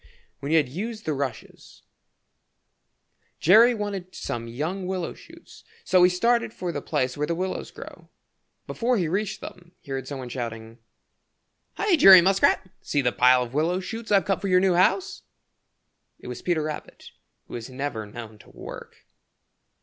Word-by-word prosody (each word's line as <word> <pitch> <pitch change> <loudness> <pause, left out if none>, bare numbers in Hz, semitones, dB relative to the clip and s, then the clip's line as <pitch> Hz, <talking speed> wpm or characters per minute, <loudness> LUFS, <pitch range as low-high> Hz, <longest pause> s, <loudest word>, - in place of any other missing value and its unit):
When 140 - -5
he - - +4
had 150 -4 +3
used 215 - -6
the 155 - 0
rushes, 140 -2 -6 1.6
Jerry 225 +8 +6
wanted 200 -4 -5
some 115 0 -5
young 160 +11 -4
willow 185 -2 -3
shoots, 335 +1 -16 0.2
so 185 -1 +3
he 180 - +7
started 230 +6 +1
for 180 -1 -3
the - - -4
place 130 -4 -1
where 150 +1 -2
the 170 - -1
willows 185 +2 -4
grow. - - -12 0.6
Before 245 +1 0
he 175 -5 0
reached 195 +5 -2
them 175 -1 -11
he 140 - -13
heard 135 -1 -4
some 140 - -5
one 130 -2 -7
shouting: 115 -2 -6 1.0
"Hi, 405 -4 +2
Jerry 190 -8 +10
Muskrat! 190 +1 +2
See 145 -2 -1
the 125 - +2
pile 125 +1 +4
of 120 0 -9
willow 165 +5 +1
shoots 225 +4 -7
I've 200 -2 +4
cut 195 - -1
for 200 - -2
your 180 -1 +4
new 185 -1 +3
house." 185 +2 +1 1.0
It - - -18
was 125 - -7
Peter 170 -3 0
Rabbit, 155 -1 -7 0.4
who - - -13
is 120 +1 -6
never 130 -5 -4
known 110 -1 -10
to - - -18
work. - - -11
175 Hz, 170 wpm, -25 LUFS, 130-195 Hz, 1.6 s, Jerry